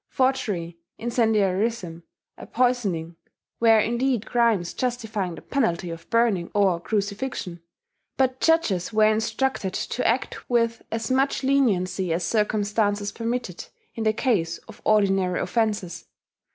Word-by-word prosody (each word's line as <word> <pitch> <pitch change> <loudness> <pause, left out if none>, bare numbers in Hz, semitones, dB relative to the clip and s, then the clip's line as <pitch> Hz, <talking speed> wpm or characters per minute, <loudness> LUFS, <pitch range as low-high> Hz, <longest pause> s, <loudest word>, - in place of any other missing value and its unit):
Forgery, 210 -11 -1 0.2
incendiarism, 220 -5 0 0.3
and - - -12
poisoning 200 -10 0 0.4
were 225 -1 +6
indeed 235 +1 0
crimes 230 -8 +1
justifying 225 -8 -2
the - - -12
penalty 180 -10 -1
of 165 0 -10
burning 230 -7 +2
or 195 -4 +3
crucifixion; 200 -2 -3 0.6
but 260 -1 +1
judges 230 - +2
were 215 -1 +4
instructed 220 -2 -1
to - - -1
act - - -2
with 230 -1 +1
as 225 +1 -2
much 270 +1 +1
leniency 195 -10 +1
as 170 +2 0
circumstances 205 0 0
permitted 230 -5 -4 0.3
in 225 - -4
the 215 - +3
case 200 -8 0
of - - -13
ordinary 195 -4 +2
offences. 195 -4 -1
215 Hz, 120 wpm, -24 LUFS, 185-240 Hz, 0.6 s, were